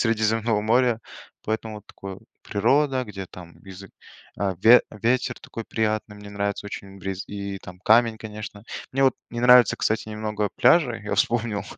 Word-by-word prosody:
Средиземного 110 -1 +1
моря. 120 +1 +2 0.5
Поэтому 110 0 -3
вот 105 - -13
такое- 95 -1 -9 0.2
природа, 135 +5 +1
где 100 -4 -7
там 85 -2 -12
бизы 95 0 -12 0.5
а, 100 -2 0
ве 120 +2 +8
ветер 120 +4 -1
такой 115 - -8
приятный, 110 -1 -2
мне 105 0 -11
нравится 100 0 -3
очень 100 -1 -8
бриз, 95 0 -5
и, 100 -1 -5
там, 90 -1 -12
камень, 115 +2 +4
конечно. 105 -1 -8 0.3
Мне 135 - +1
вот 130 - +4 0.2
не 120 - -4
нравится, 125 -1 +6
кстати, 110 0 -1
немного 105 -1 -2
пляжи, - - +4
я - - -2
вспомнил, 115 -3 0
110 Hz, 160 wpm, -24 LUFS, 100-115 Hz, 0.5 s, ве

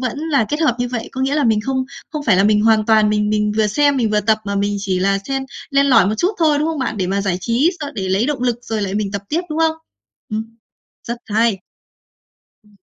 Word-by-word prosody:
vẫn 255 +2 -3
là 295 -6 +1
kết 295 +2 -2
hợp 270 -7 +2
như 245 0 -1
vậy. 240 -2 -4
Có 260 - -5
nghĩa 270 +2 0
là 300 - +1
mình 220 -2 +3
không 260 +2 -1 0.3
không 300 -1 -4
phải 210 -6 +4
là 195 - +3
mình 210 0 +4
hoàn 220 -1 +3
toàn 215 -1 +4
mình 210 0 +1
mình 210 0 +1
vừa 220 -1 +3
xem 285 +6 +2
mình 225 -4 +1
vừa 210 0 +2
tập, 220 +1 +2
mà 200 0 -3
mình 205 +1 0
chỉ 190 -2 -1
là 195 +1 +1
xen 270 0 -1 0.3
len 280 0 +3
lỏi 230 -8 +5
một 210 - 0
chút 360 - +2
thôi, 310 -3 +3
đúng 305 - 0
không 320 -2 -3
bạn? 255 -5 -2
Để 185 - -1
mà 195 +2 -1
giải 190 -3 -1
trí 245 - +2
s 295 - -3
để 190 -1 -3
lấy 195 +5 +1
động 280 -4 -2
lực 240 -2 0
rồi 220 -2 -3
lại 195 -1 -3
mình 205 -1 -1
tập 200 -1 -3
tiếp, 325 - 0
đúng 305 - -3
không? 320 -1 +2 0.5
Ừm, 220 +1 -5 0.5
rất 235 - -2
hay! 220 -3 +1 1.0
Ừm. 210 -1 -25
225 Hz, 265 wpm, -18 LUFS, 210-275 Hz, 1.0 s, lỏi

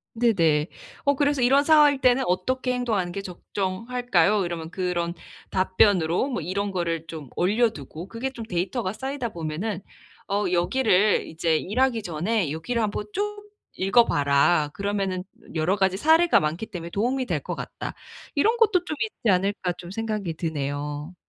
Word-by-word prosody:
네네. 170 -10 +3 0.4
어 285 - +4
그래서 285 -1 +1
"이런 270 +4 +5
상황일 295 -3 +5
때는 255 0 +4
어떻게 255 +8 0
행동하는 220 -8 -1
게 195 +2 -5
적정할까요?" 195 +1 0
이러면 165 -2 -5
그런 175 -1 -2 0.3
답변으로 185 - +2
뭐 245 - -2
이런 200 +5 -2
거를 170 -3 -2
좀 155 -5 -8
올려두고 185 - 0
그게 235 +5 -4
좀 235 -4 -7
데이터가 190 +2 -2
쌓이다 265 -1 -4
보면은 175 +4 -4 0.5
어 205 +1 0
여기를 200 +2 +3
이제 160 0 0
"일하기 230 +6 0
전에 175 +1 -1
여기를 225 +10 -2
한번 210 0 -2
쭉 415 0 -3 0.3
읽어봐라. 150 -7 +3
그러면은 195 -2 -2 0.3
여러 160 +5 +2
가지 190 -1 +2
사례가 320 - +5
많기 160 +8 -2
때문에 170 -1 -7
도움이 255 +7 0
될 - - -1
것 - - -5
같다." - - -6 0.4
'이런 435 +11 +3
것도 425 -6 +3
좀 310 - -3
있지 335 - 0
않을까.' 185 -1 0
좀 175 - -9
생각이 210 -4 -3
드네요. 145 0 -4
195 Hz, 335 characters per minute, -25 LUFS, 170-245 Hz, 0.5 s, 이런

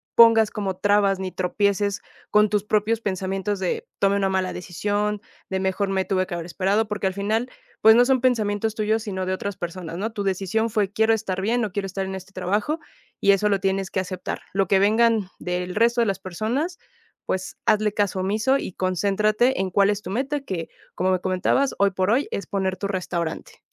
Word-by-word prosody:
pongas 225 -2 +7
como 195 -3 -3
trabas 200 0 +3
ni 190 0 -4
tropieces 200 +2 0 0.3
con 210 0 +5
tus 210 -1 +1
propios 215 +2 +1
pensamientos 195 0 -2
de: 185 -2 -2
"Tomé 200 0 +3
una 195 -1 +1
mala 190 -1 0
decisión". 205 +4 -2 0.3
De: 190 - -1
"Mejor 190 +1 0
me 190 -1 0
tuve 185 -1 0
que - - -4
haber 170 -1 -5
esperado". 200 +5 0
Porque 210 -2 -1
al 190 - -3
final, 220 +5 -1 0.3
pues 220 +1 +8
no 245 +1 +6
son 260 -1 +2
pensamientos 220 -3 +1
tuyos, 220 +1 0
sino 190 -4 -3
de 185 - -1
otras 200 +1 -4
personas, 170 -1 -6
¿no? 220 +4 -2
Tu 210 - -4
decisión 195 +4 0
fue: 205 -3 0
"Quiero 220 +1 +3
estar 190 -4 -3
bien, 235 +5 +1
no 215 - -2
quiero 200 0 -3
estar 195 +1 -3
en 190 - -5
este 190 0 -8
trabajo 205 - -1 0.4
y 200 - +5
eso 205 +1 +2
lo 200 - +2
tienes 195 0 -1
que 190 - -1
aceptar". 185 0 -5
Lo 195 -1 +1
que 195 - +4
vengan 215 0 +3
del 180 0 -3
resto 235 +2 +3
de - - +3
las 195 -2 -1
personas, 225 - -2 0.5
pues 185 0 -3
hazle 215 0 +3
caso 205 -2 0
omiso 215 +8 +1
y 185 - -6
concéntrate 205 +6 +1
en 190 - -2
cuál 200 +2 +4
es 205 0 -1
tu 185 - -6
meta 275 +6 -1
que, 180 -11 -5 0.2
como 185 - 0
me 185 - +1
comentabas, 185 +9 +1
hoy 200 0 +5
por 185 +2 0
hoy 265 +5 +2
es 200 - -3
poner 190 -1 -2
tu 200 - -3
restaurante. 175 -4 -4
200 Hz, 205 wpm, -23 LUFS, 190-215 Hz, 0.5 s, pues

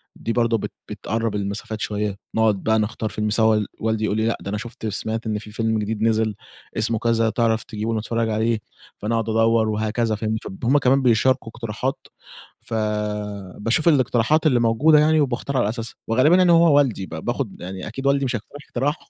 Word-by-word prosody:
دي 115 - -3
برضه 115 -1 +2
بت - - -5 0.2
بتقرب 115 -1 -2
المسافات 105 +2 -4
شوية، 105 -1 -2 0.2
نقعد 110 -3 +2
بقى 110 0 +2
نختار 110 +1 -2
فيلم 105 0 -2
سوا، 110 -1 +3
والدي 110 0 -1
يقول 105 - 0
لي 110 - +1
لأ 115 - 0
ده 100 - -6
أنا 105 - -2
شُفت 115 +1 -6
سمعت 110 +3 -3
إن 105 -1 -1
في 105 0 -11
فيلم 110 0 0
جديد 105 +1 -3
نزل 110 -1 +1 0.4
اسمه 110 0 +1
كذا، 115 -1 +2
تعرف 115 -1 +1
تجيبه 110 +1 -3
نتفرج 115 +1 -1
عليه، 110 +1 +1 0.4
فأنا 110 +3 -1
أقعد 115 -1 -1
أدوّر 115 0 +3
وهكذا، 110 +1 0
فاهم؟ 110 +1 -2
ف - - -7 0.2
هُم 135 +5 +4
كمان 135 0 +3
بيشاركوا 125 0 +2
اقتراحات 120 +3 -4 0.5
ف - - -10 0.8
باشوف 115 +10 0
الاقتراحات 140 +1 +3
اللي 125 -5 +3
موجودة 130 +7 +4
يعني 155 +1 +4
وباختار 135 0 -1
على 115 -5 +2
أساسها، 115 0 -5
وغالبا 130 +9 +4
يعني 180 -1 +5
هو 165 -3 +6
والدي 120 -9 +1
ب - - -15
باخد 120 -4 -4
يعني 95 +2 -6
أكيد 135 +5 -6
والدي 140 0 +2
مش 125 -2 -1
هيقترح 120 +6 -8
اقتراح 140 +5 0
115 Hz, 190 wpm, -22 LUFS, 110-125 Hz, 0.8 s, هو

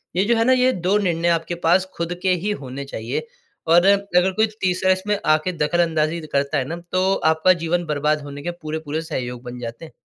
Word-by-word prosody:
ये 185 - +3
जो 235 +2 +3
है 225 - +3
ना 260 - +5
ये 255 0 +3
2 185 -1 +1
निर्णय 175 -4 0
आपके 170 +1 0
पास 185 +2 +4
ख़ुद 170 +1 -2
के 185 -1 +2
ही 185 +4 -1
होने 135 +1 -6
चाहिए। 120 - -4 0.4
और 175 +2 +5
अगर 195 -2 +3
कोई 220 +3 +3 0.2
तीसरा 185 0 +2
इसमें 200 +2 0
आके 155 +3 +2
दखलअंदाज़ी 160 0 +1
करता 140 +1 0
है 130 - 0
ना। 160 - -4 0.2
तो 185 +1 +2 0.2
आपका 160 +4 +4
जीवन 175 +1 0
बर्बाद 150 0 0
होने 145 0 -8
के 175 - -2
पूरे-पूरे 155 0 -4
सहयोग 125 -6 -5
बन 125 0 -8
जाते 120 +5 -7
हैं। 155 - -13
170 Hz, 210 wpm, -21 LUFS, 150-185 Hz, 0.4 s, ना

